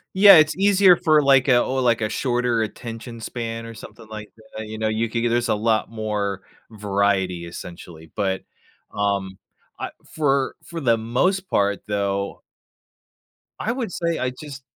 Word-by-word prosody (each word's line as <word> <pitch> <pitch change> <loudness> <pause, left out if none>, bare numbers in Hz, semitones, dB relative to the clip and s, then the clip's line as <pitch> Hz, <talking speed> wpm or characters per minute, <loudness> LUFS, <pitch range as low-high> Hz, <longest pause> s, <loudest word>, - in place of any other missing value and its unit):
Yeah, 195 -2 +9
it’s 155 0 +4
easier 195 -2 +6
for, 155 -4 +4
like, 135 -1 +4
a 120 -2 +5
or, 130 0 -1
like, 120 -2 +2
a 110 - 0
shorter 120 -3 0
attention 115 +2 -6
span 115 0 -5
or 115 - -8
something 110 0 -12
like 110 -1 -8 0.3
that, 110 - -6
you 110 0 -7
know, 110 0 -1
you 110 +1 -1
could 115 0 -2
get 120 - +1
there’s 120 +1 0
a - - +3
lot 110 +1 0
more 105 -3 -3 0.3
variety, 100 -4 0
essentially. 85 -1 -10
But, 95 -2 -1 0.5
um, 100 -2 -1 0.4
I - - -4 0.2
for 140 -3 +1
for 170 -1 -7
the 120 -6 +2
most 185 - 0
part, 100 0 0
though 100 -1 -2 1.2
I 225 - -1
would 240 -6 -3
say 170 -1 -2
I 130 - 0
just 140 +1 -10
115 Hz, 165 wpm, -22 LUFS, 105-135 Hz, 1.2 s, Yeah